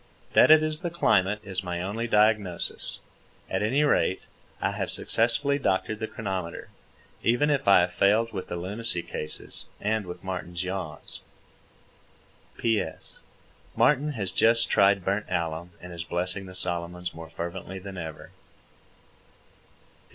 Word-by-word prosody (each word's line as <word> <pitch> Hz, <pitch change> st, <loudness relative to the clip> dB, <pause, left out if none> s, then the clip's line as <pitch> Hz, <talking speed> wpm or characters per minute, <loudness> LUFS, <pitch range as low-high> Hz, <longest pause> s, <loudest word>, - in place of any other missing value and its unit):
That -, -, +7 dB
it 155 Hz, 0 st, +8 dB
is 155 Hz, 0 st, +2 dB
the 175 Hz, -1 st, -2 dB
climate 105 Hz, -, +2 dB
is 95 Hz, -2 st, -4 dB
my 90 Hz, -1 st, -3 dB
only 105 Hz, +6 st, -2 dB
diagnosis. 105 Hz, -5 st, +2 dB, 0.5 s
At 95 Hz, -, 0 dB
any 130 Hz, +8 st, +2 dB
rate, 95 Hz, -9 st, +2 dB, 0.4 s
I -, -, 0 dB
have -, -, -3 dB
successfully 140 Hz, +5 st, +1 dB
doctored 105 Hz, -2 st, 0 dB
the 110 Hz, -, -2 dB
chronometer, 95 Hz, -7 st, -4 dB, 0.5 s
even 120 Hz, +6 st, +3 dB
if 140 Hz, -5 st, 0 dB
I 100 Hz, -2 st, +8 dB
have 90 Hz, +1 st, -1 dB
failed 110 Hz, +5 st, +3 dB
with 95 Hz, -, -4 dB
the -, -, -4 dB
lunacy 95 Hz, +1 st, -3 dB
cases 75 Hz, -3 st, -4 dB
and 105 Hz, -1 st, -1 dB
with 90 Hz, -, -8 dB
Martin's 90 Hz, -1 st, -4 dB
yaws. 95 Hz, +1 st, -5 dB, 1.4 s
P.S. 110 Hz, -8 st, -1 dB, 0.6 s
Martin 150 Hz, +2 st, +3 dB
has 100 Hz, -7 st, -2 dB
just 115 Hz, +3 st, +4 dB
tried 100 Hz, -2 st, +4 dB
burnt 100 Hz, +2 st, 0 dB
alum, 85 Hz, 0 st, -2 dB
and 90 Hz, 0 st, -9 dB
is 85 Hz, -1 st, -5 dB
blessing 90 Hz, +3 st, -2 dB
the 90 Hz, -, -8 dB
Solomons 90 Hz, 0 st, -2 dB
more 80 Hz, 0 st, -9 dB
fervently 85 Hz, +3 st, -6 dB
than 95 Hz, +1 st, -8 dB
ever. 80 Hz, -2 st, -7 dB
95 Hz, 140 wpm, -27 LUFS, 90-115 Hz, 1.4 s, it